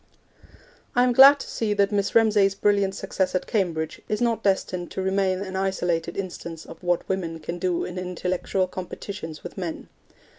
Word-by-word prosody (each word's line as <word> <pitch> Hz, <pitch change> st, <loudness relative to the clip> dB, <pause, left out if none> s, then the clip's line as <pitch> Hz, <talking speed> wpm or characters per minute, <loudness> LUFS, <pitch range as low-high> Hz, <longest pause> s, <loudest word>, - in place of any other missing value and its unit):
I 245 Hz, -, +5 dB
am 250 Hz, -1 st, +3 dB
glad 275 Hz, +3 st, +9 dB
to -, -, -7 dB
see 210 Hz, -2 st, -1 dB
that 200 Hz, 0 st, +2 dB
Miss 200 Hz, -1 st, 0 dB
Ramsay's 210 Hz, -3 st, +4 dB
brilliant 200 Hz, -1 st, +2 dB
success 190 Hz, -1 st, -2 dB
at 185 Hz, -, 0 dB
Cambridge 170 Hz, -7 st, -1 dB
is 210 Hz, -, 0 dB
not 230 Hz, -2 st, +1 dB
destined 185 Hz, -3 st, 0 dB
to 190 Hz, -, -4 dB
remain 190 Hz, -1 st, +1 dB
an 190 Hz, -1 st, -5 dB
isolated 175 Hz, -3 st, -1 dB
instance 170 Hz, -4 st, -6 dB
of 165 Hz, -, -12 dB
what 175 Hz, -1 st, 0 dB
women 170 Hz, -4 st, -2 dB
can 170 Hz, +3 st, -5 dB
do 180 Hz, -1 st, 0 dB
in 180 Hz, 0 st, -5 dB
intellectual 185 Hz, +1 st, -1 dB
competitions 185 Hz, -2 st, -7 dB
with -, -, -8 dB
men. 170 Hz, -3 st, -5 dB
190 Hz, 175 wpm, -25 LUFS, 175-200 Hz, -, glad